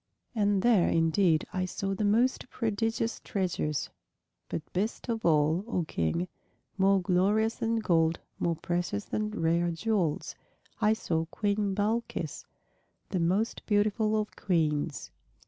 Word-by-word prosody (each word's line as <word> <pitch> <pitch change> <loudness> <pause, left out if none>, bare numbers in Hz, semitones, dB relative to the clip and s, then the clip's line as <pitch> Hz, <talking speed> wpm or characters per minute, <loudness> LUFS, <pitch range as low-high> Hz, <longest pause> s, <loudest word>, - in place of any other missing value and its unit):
And 205 -4 +2
there, 225 -7 +4
indeed, 165 0 +3
I 185 0 0
saw 195 +2 -3
the 195 - -2
most 235 +5 +2
prodigious 225 0 -1
treasures; 175 -6 -2 0.6
but 155 - -3
best 210 +8 -2
of 225 -1 -1
all, 155 +3 +3
O 185 -7 0
King, 155 - -1 0.5
more 195 0 +4
glorious 200 +5 +2
than 230 0 0
gold, 165 -7 +2 0.2
more 170 -1 +1
precious 175 -10 -2
than 215 0 -2
rare 170 -4 +1
jewels, 170 -2 -1 0.5
I 215 0 +5
saw 165 -6 -1
Queen 205 +2 -1
Balkis, 220 +3 -2 0.6
the 185 - -1
most 190 +7 0
beautiful 215 +1 +2
of 210 - -4
queens." 150 - -1
195 Hz, 130 wpm, -29 LUFS, 165-215 Hz, 0.6 s, I